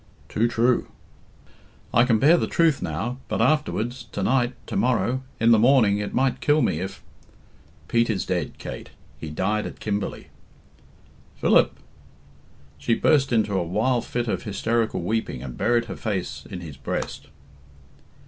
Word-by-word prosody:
"Too 115 +2 +1
true." 120 +1 +2 1.1
"I 120 - +5
can 115 -3 +3
bear 145 +9 +6
the - - 0
truth 165 -4 +2
now 125 +2 -3
but - - -2
afterwards 125 -5 0
to 100 - -2
night 125 +2 +1
tomorrow 125 +1 0 0.2
in 115 +1 +4
the 115 - +6
morning 115 -4 +4
it 105 - -3
might 130 0 0
kill 150 +1 +3
me 80 - 0
if 95 +2 -6 0.4
" - - -29
"Pete 115 0 +2
is 100 -4 -1
dead, 90 -4 -2
Kate; - - -8 0.3
he 80 - -6
died 105 +7 -1
at - - -10
Kimberley." 105 -2 -3 1.1
"Philip!" - - +3 1.0
She 115 +11 +1
burst 140 -1 +3
into 110 -3 +2
a 95 - +1
wild 115 +8 0
fit 120 0 -3
of - - -1
hysterical 110 -1 -1
weeping, 105 - -2
and 65 -3 -7
buried 120 - +1
her - - -6
face 100 -5 -4
his 90 -1 -7
his 75 -5 -9
breast. - - -4
115 Hz, 155 wpm, -24 LUFS, 100-125 Hz, 1.1 s, bear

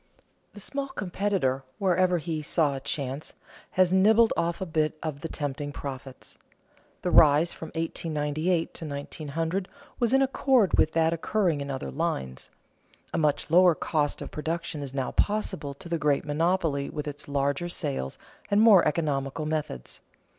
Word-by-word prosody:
The - - -9
small 275 +7 -3
competitor, 190 - -1
wherever 185 -1 +2
he 160 -1 -3
saw 150 -2 +1
a - - -4
chance, 140 +1 -4 0.4
has 185 -1 +3
nibbled 220 +4 +5
off 170 0 -1
a 190 - -2
bit 155 -2 0
of 150 -3 -4
the 165 - -3
tempting 145 -1 -4
profits. 135 -2 -8 0.6
The 180 - 0
rise 155 +2 +6
from 160 - -8
1898 160 +1 -1
to 165 - -7
1900 160 +5 -3 0.3
was 235 -3 +2
in 270 +1 +5
accord 260 -5 +3
with 155 - +3
that 165 0 +3
occurring 170 -2 0
in 140 - -5
other 135 -1 -4
lines. 135 - -3 0.6
A - - +1
much 150 -1 +1
lower 180 0 +6
cost 150 -2 -1
of - - -9
production 160 0 -3
is 140 -2 -5
now 135 -2 -1
possible 190 -9 -1
to 155 - -11
the 170 -1 -1
great 145 -1 +1
monopoly 155 -2 0
with 150 0 -5
its 145 0 -6
larger 140 +4 0
sales 140 - -3 0.3
and 205 - +3
more 215 -5 +7
economical 145 -1 -1
methods. 150 - -4
160 Hz, 155 wpm, -27 LUFS, 145-180 Hz, 0.6 s, more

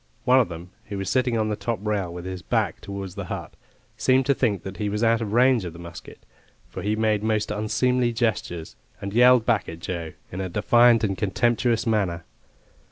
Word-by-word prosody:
One 130 +1 +6
of 120 - +2
them, 85 +1 -9
who 100 - -6
was 95 -1 -3
sitting 125 -2 +1
on 110 -1 0
the 105 - -1
top 115 +1 -2
rail 100 -5 -1
with 90 +1 -7
his 95 -1 -5
back - - -1
towards 100 -2 -6
the - - -6
hut, - - -6 0.4
seemed 130 0 +3
to 140 - +3
think 100 -7 0
that 95 0 -7
he 105 -1 -1
was 105 +2 -2
out 115 0 +3
of 105 -3 -3
range 125 -1 +4
of 85 -2 -6
the - - -11
musket, 85 -1 -11 0.4
for 95 - -7
he 105 +3 0
made 110 -1 +1
most 110 -1 0
unseemly 120 +4 +1
gestures, 110 -8 -2 0.2
and 100 0 -5
yelled 125 0 +6
back 115 -4 +1
at 80 - -7
Joe 85 -1 -5 0.2
in 90 - -4
a 95 - -3
defiant 120 +4 +4
and 100 -2 0
contemptuous 115 +3 +1
manner. 95 -7 0
105 Hz, 210 wpm, -24 LUFS, 95-120 Hz, 0.4 s, One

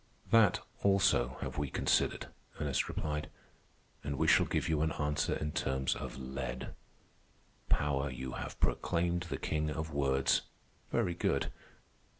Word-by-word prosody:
"That, 110 -5 +6 0.2
also, 95 -11 +3
have - - -3
we 75 -2 -1
considered," - - +1 0.3
Ernest 70 -4 0
replied. 75 0 -2 0.7
"And 70 -1 -3
we 80 - +2
shall - - +5
give - - 0
you 80 -2 +1
an 80 0 +1
answer 75 0 0
in 75 0 -2
terms 65 -2 0
of - - -6
lead. 65 -1 -5 1.0
Power 70 -1 +2
you 65 0 -5
have - - -6
proclaimed 85 +1 0
the - - -2
king 75 0 -1
of 80 0 -4
words. 70 -1 +3 0.5
Very 90 - +1
good. 85 - 0
75 Hz, 140 wpm, -33 LUFS, 65-80 Hz, 1.0 s, That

